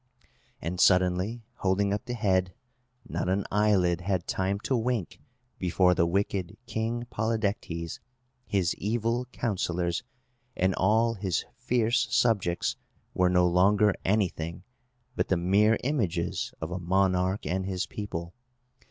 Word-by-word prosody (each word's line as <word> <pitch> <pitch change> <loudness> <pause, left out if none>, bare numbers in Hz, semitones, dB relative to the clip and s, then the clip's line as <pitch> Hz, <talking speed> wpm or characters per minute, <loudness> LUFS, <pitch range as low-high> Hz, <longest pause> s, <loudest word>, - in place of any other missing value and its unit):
And, 85 +3 -4
suddenly 95 +5 +3
holding 100 +1 +1
up 105 - -3
the 120 - -3
head, 95 -4 +1 0.5
not - - -2
an 95 +2 0
eyelid 95 -4 +2
had 95 -2 -1
time 95 +1 -1
to 130 - 0
wink 115 -5 -1 0.4
before 90 0 +3
the 85 -1 +2
wicked 95 -1 -1
King 115 +1 -2
Polydectes, 100 -7 -2 0.5
his 95 -4 +1
evil 115 +3 -1
counsellors, 90 -8 -2 0.5
and 95 +1 +2
all 110 +5 +3
his 95 -5 -2
fierce 120 -1 +1
subjects 115 -8 +1 0.4
were 90 -1 +3
no 90 0 +4
longer 100 +4 +4
anything 90 -4 -1 0.5
but - - 0
the 95 - +2
mere 100 +6 +3
images 100 - -1
of 80 +2 -5
a 90 - -3
monarch 95 +2 +1
and 95 +1 -1
his 95 -2 -1
people. 85 -5 -6
95 Hz, 125 wpm, -28 LUFS, 90-110 Hz, 0.5 s, no